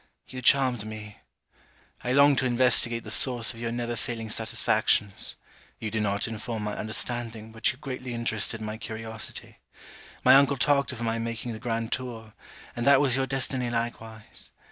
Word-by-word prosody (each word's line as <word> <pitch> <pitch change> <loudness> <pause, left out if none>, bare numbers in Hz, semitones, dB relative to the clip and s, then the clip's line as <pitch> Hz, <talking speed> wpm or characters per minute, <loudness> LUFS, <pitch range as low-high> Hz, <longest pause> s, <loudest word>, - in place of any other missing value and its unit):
You 130 0 -7
charmed 130 -3 +3
me. 105 -1 -8 0.9
I 125 - -1
longed 140 0 +5
to 130 - +1
investigate 120 -1 +3
the 110 - -5
source 120 -1 +3
of 115 - -12
your 115 -1 -3
never 120 0 -2
failing 115 -2 -4
satisfactions. 105 -2 +1 0.4
You 110 - -5
did 110 - -1
not 100 0 0
inform 110 0 -5
my 105 0 -3
understanding, 110 0 -4
but 110 +1 +2
you 125 - -13
greatly 130 -3 -6
interested 110 -1 -1
my 110 0 -4
curiosity. 110 -1 -7 0.7
My 130 - +8
uncle 140 +1 +5
talked 140 +1 +3
of 125 -2 -7
my 115 0 -1
making 115 +1 -3
the 110 - -7
grand 115 0 -2
tour; 115 -4 -5 0.4
and 120 - -3
that 140 -1 +7
was 135 -3 +3
your 135 0 0
destiny 130 -2 -1
likewise. 115 -2 -5
115 Hz, 165 wpm, -27 LUFS, 110-125 Hz, 0.9 s, My